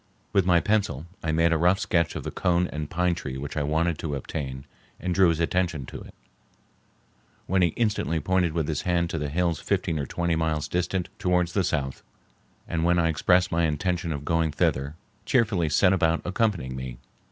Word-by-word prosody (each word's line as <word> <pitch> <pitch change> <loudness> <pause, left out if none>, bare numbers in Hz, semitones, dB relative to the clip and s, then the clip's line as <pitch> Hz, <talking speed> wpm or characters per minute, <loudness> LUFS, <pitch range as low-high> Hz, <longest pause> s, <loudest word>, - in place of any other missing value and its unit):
With 100 -3 +3
my 90 -2 +5
pencil 85 -6 0 0.2
I 80 - 0
made 85 +1 +3
a 80 - +1
rough 90 +3 +4
sketch 85 -6 0
of - - -4
the - - -4
cone 90 0 +1
and 75 -1 -4
pine 90 0 +1
tree 70 -8 -5
which 70 +2 -6
I 75 - 0
wanted 80 +3 0
to 75 -3 -3
obtain 65 -1 -5 0.3
and 90 0 -2
drew 95 0 +5
his 80 -1 0
attention 85 -4 0
to - - -8
it, - - -13 1.3
when 95 +1 +1
he 90 - +5
instantly 105 -8 0
pointed 90 +1 +1
with 80 -3 -1
his 80 - -1
hand 85 -1 0
to 80 - -2
the 75 -1 -2
hills 85 0 0
fifteen 80 - -1
or 70 - -3
twenty 85 +2 -1
miles 80 -2 -1
distant 90 +1 -1
towards 90 -3 +1
the 100 - +2
south; 70 -5 -2 0.7
and 80 -1 -1
when 85 +1 +3
I 85 -1 +3
expressed 90 +3 +3
my 85 0 +2
intention 85 +2 -1
of 75 -2 -4
going 80 -1 +1
thither, 70 +1 0 0.3
cheerfully 105 - +2
set 90 +5 +4
about 85 -3 +1
accompanying 90 - 0
me. 65 -2 -6
85 Hz, 200 wpm, -26 LUFS, 75-90 Hz, 1.3 s, my